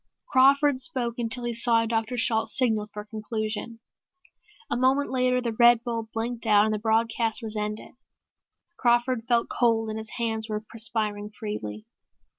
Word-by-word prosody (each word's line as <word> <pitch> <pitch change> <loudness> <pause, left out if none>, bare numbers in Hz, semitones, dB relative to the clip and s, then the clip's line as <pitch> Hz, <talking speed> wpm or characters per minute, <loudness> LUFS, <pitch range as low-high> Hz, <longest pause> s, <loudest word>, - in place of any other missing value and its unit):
Crawford 275 0 +3
spoke 245 -6 -2
until 240 +1 +2
he 240 0 -2
saw 230 0 +3
Dr. 225 +1 -2
Shalt 225 -1 +3
signal 220 -5 +2
for 210 0 -8
a - - -14
conclusion. 215 +1 -5 0.9
A - - -2
moment 265 +3 +1
later 255 -1 +1
the 235 -2 -3
red 235 0 +4
bulb 230 -2 -4
blinked 230 +1 -4
out 210 0 +5
and 215 - -1
the 215 - -3
broadcast 225 +1 0
was 220 -1 -3
ended. 210 0 -4 0.9
Crawford 240 -1 +1
felt 235 -1 +1
cold 225 -2 +1
and 215 0 -4
his 220 0 -5
hands 225 -1 -2
were 210 0 -2
perspiring 215 -2 +1
freely. 205 - -7
230 Hz, 160 wpm, -25 LUFS, 215-240 Hz, 0.9 s, out